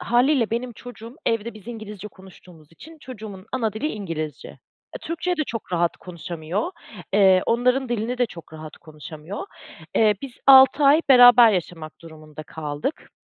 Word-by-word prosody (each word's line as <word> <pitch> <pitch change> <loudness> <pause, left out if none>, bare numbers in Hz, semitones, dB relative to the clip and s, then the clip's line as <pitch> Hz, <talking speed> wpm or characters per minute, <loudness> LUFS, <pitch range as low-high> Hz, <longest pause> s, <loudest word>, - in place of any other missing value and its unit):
hâliyle 245 0 +1
benim 240 +2 -3
çocuğum 235 +1 -12
evde 230 0 -1
biz 215 +1 -14
ingilizce 210 -3 -8
konuştuğumuz 180 -5 -18
için 320 - -15
çocuğumun 215 -7 -10
ana 230 -5 -1
dili 220 +8 -4
ingilizce. 165 - -6 0.5
E, - - -6
Türkçeye 355 -2 -3
de 310 - -1
çok 225 -9 -7
rahat 170 -1 0
konuşamıyor, 175 - -5 0.4
ııı, 190 -2 +5
onların 250 +3 +1
dilini 240 +1 -3
de 245 - +2
çok 170 -7 -14
rahat 155 -1 -10
konuşamıyor. 155 - -10 0.5
Eee, 215 -2 +3
biz 275 -2 -7
6 270 +1 +7
ay 290 +3 +6
beraber 245 -3 +8
yaşamak 165 -4 -5
durumunda 155 -2 -12
kaldık. 150 - -6
215 Hz, 150 wpm, -22 LUFS, 170-245 Hz, 0.5 s, beraber